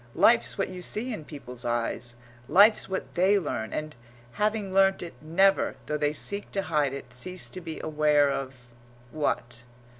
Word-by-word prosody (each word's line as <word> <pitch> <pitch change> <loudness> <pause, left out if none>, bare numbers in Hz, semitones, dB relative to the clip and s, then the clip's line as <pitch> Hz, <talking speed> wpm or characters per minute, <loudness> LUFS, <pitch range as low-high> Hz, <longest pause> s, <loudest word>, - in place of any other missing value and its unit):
Life's 230 -1 +4
what 195 - -1
you 185 -1 -7
see 225 +7 -3
in 160 -8 -7
people's 125 -5 -8
eyes; 120 0 -2 0.3
life's 205 +3 +5
what 190 - -4
they 190 +3 +4
learn, 130 - -3
and, 155 0 -4 0.4
having 210 - -1
learnt 195 -1 +4
it, 170 - -8
never, 190 +4 +3
though 150 - -2
they 150 -1 +1
seek 200 +6 -3
to 195 - 0
hide 150 -6 +1
it, 140 0 -8
cease 185 0 -2
to 185 - -7
be 165 -2 -6
aware 150 -2 +3
of 130 -3 -6 0.4
what? 120 -6 -2
155 Hz, 170 wpm, -27 LUFS, 140-195 Hz, 0.4 s, life's